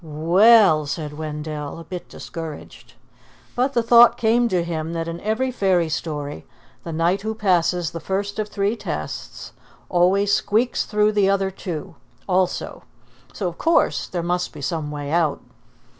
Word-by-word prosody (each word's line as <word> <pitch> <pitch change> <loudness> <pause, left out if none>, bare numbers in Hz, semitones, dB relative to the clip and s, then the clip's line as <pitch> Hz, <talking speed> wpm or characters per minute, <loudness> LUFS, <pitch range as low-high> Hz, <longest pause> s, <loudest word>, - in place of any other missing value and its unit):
"We 160 +4 0
ell!" 200 -11 +6
said 150 0 -4
Wendell, 150 -1 -5
a 165 - -9
bit 175 +2 -8
discouraged. 165 -3 -9 0.6
But 255 +3 +1
the 235 - +1
thought 235 0 +7
came 235 +1 +2
to 180 -4 +1
him 165 -1 -4
that 165 0 -3
in 165 0 -5
every 225 +5 -1
fairy 185 -8 +1
story 145 - -4 0.4
the 165 - -6
knight 170 +4 +1
who 220 +1 -3
passes 180 -4 +1
the 165 - -6
first 200 +4 -3
of 210 0 -2
three 200 +2 -1
tests - - -6 0.4
always 195 +3 +3
squeaks 225 +6 +1
through 210 -1 +2
the 205 -2 +2
other 195 -1 +1
two 180 -1 -6 0.3
also, 185 -1 -1 0.5
so 190 - -3
of 170 - -7
course 330 +1 +2
there 175 -2 -4
must 180 +1 -1
be 150 - -9
some 155 +1 -2
way 145 -1 -5
out. 160 -3 +1
180 Hz, 160 wpm, -22 LUFS, 160-205 Hz, 0.6 s, thought